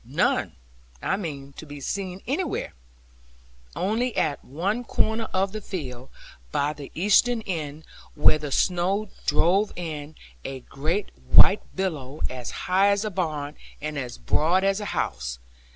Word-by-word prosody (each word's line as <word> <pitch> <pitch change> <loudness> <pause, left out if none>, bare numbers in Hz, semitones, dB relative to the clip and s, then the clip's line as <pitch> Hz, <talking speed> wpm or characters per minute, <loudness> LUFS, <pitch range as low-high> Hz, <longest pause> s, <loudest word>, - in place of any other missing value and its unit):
None, - - +1 0.5
I 190 - +2
mean, 140 -8 -5
to - - -7
be 145 0 -8
seen 185 +5 -3
anywhere; 290 - -1 1.0
only 225 +6 0
at 150 -3 +1
one 195 - -1
corner 225 -1 +1
of 190 +1 +1
the 215 +1 -5
field, 130 -10 -6 0.4
by 145 +1 +1
the 145 -2 -9
eastern 215 +6 +4
end, 155 -5 -4 0.3
where 155 +1 +5
the 150 -1 -5
snow 190 +7 +2 0.2
drove 185 +7 +4
in, 155 -3 -5 0.3
a 135 -1 -5
great 160 +11 -2 0.2
white - - +8
billow, 155 -7 -2
as 125 -2 -5 0.2
high 190 +2 +4
as 200 +1 +3
a 215 - -2
barn, 155 -5 -2 0.2
and 150 +1 -4
as 125 -4 -4
broad 160 - +2
as 195 +1 +2
a 210 - -4
house. - - -2
170 Hz, 145 wpm, -26 LUFS, 145-200 Hz, 1.0 s, white